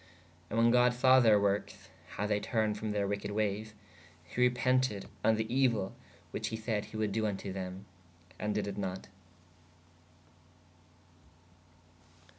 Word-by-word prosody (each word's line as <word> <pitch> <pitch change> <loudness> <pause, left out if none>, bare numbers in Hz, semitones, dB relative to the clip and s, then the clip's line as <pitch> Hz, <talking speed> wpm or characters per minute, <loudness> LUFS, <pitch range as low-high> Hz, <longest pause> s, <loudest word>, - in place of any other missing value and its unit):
And 110 - -3
when 115 +1 +5
god 125 0 +4
saw 130 +1 +6
theyr 110 -3 +6
workes/ 100 0 -1 0.3
how 105 - -1
they 105 0 +1
turned 110 -1 0
from 110 0 -3
theyr 100 -1 0
weked 100 0 -3
wayes/ 105 +1 -2 0.5
he 105 +7 -4
repented 125 -3 +2 0.2
on 110 0 +4
[the] 110 0 -1
euell 115 -5 +1 0.4
which - - -3
he 110 - -3
sayd 110 -2 -2
he 110 - -9
wold 110 -1 0
doo 110 - 0
vn 105 -3 -1
to 95 -1 -6
them/ 95 0 -6 0.5
ād 105 0 -1
dyd 105 - 0
it 100 0 -5
not. 95 -1 -4
105 Hz, 150 wpm, -32 LUFS, 100-115 Hz, 0.5 s, saw